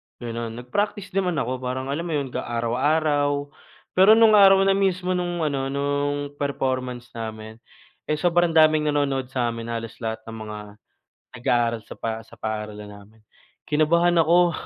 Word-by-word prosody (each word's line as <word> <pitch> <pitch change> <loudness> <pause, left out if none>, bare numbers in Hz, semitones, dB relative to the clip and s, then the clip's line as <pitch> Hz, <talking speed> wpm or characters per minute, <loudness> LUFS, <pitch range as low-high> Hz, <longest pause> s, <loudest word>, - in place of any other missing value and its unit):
ganun 115 -1 -5
nag-practice 205 - -2
naman 180 -3 0
ako 130 -2 -2
parang 130 +1 -4
alam 165 +4 -3
mo 165 - -3
'yon 140 -3 -2
ka - - -3
araw-araw 145 +4 0 0.4
pero 195 +4 +6
nung 225 -1 +6
araw 195 -2 +7
na 195 - +3
mismo 185 -2 0
nung 175 -2 -1
ano 135 -3 -1
nung 145 +1 -2
performance 130 -3 -3
namin 110 -1 -7 0.5
eh 155 - +1
sobrang 175 0 +1
daming 155 -1 +5
nanonood 140 -3 0
samin 120 -3 -3
halos 115 -1 -4
lahat 110 -1 -4
ng 115 0 -9
mga 105 -1 -7 0.8
nag-aaral 115 -2 +1
sa - - -9
pa 110 0 -4
sa 115 - -15
paaralan 105 -1 -5
namin. 105 +2 -16 0.4
Kinabahan 170 +3 +3
ako 175 +2 +4
140 Hz, 150 wpm, -23 LUFS, 115-170 Hz, 0.8 s, araw